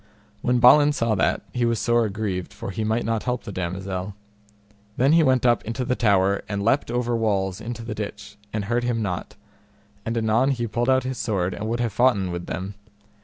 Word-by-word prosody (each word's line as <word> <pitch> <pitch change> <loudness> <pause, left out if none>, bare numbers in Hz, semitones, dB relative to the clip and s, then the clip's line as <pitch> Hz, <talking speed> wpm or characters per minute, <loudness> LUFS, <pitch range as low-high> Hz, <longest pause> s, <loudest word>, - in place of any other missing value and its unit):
When 125 0 +2
Balin 145 +5 +6
saw 115 -5 0
that, 100 - +1
he 125 - 0
was 115 -1 +1
sore 120 +1 +2
aggrieved, 100 -3 -3
for - - -6
he 110 +3 -3
might 110 +2 0
not 115 -1 0
help 125 -1 -2
the 110 - -7
damosel. 95 +1 -4 0.8
Then 135 +3 +4
he 165 - +6
went 130 -5 +3
up 120 -3 +3
into 120 +3 -3
the 125 - 0
tower, 100 -4 +2
and 100 -1 -2
leapt 115 +5 +1
over 120 0 0
walls 100 -3 0
into 115 0 -6
the 115 -1 -5
ditch, 105 -1 -7 0.2
and 105 -2 -3
hurt 120 +3 0
him 120 -2 0
not; 90 -3 -4 0.7
and 115 +1 -2
anon 115 +4 +2
he 120 -4 -1
pulled 120 +3 -1
out 130 -1 +3
his 130 -2 -4
sword 95 -5 -1
and 105 +2 -5
would 115 +1 -1
have 115 -4 -1
foughten 100 -7 +2
with 85 0 -5
them. 95 +4 -4
115 Hz, 210 wpm, -24 LUFS, 100-120 Hz, 0.8 s, Balin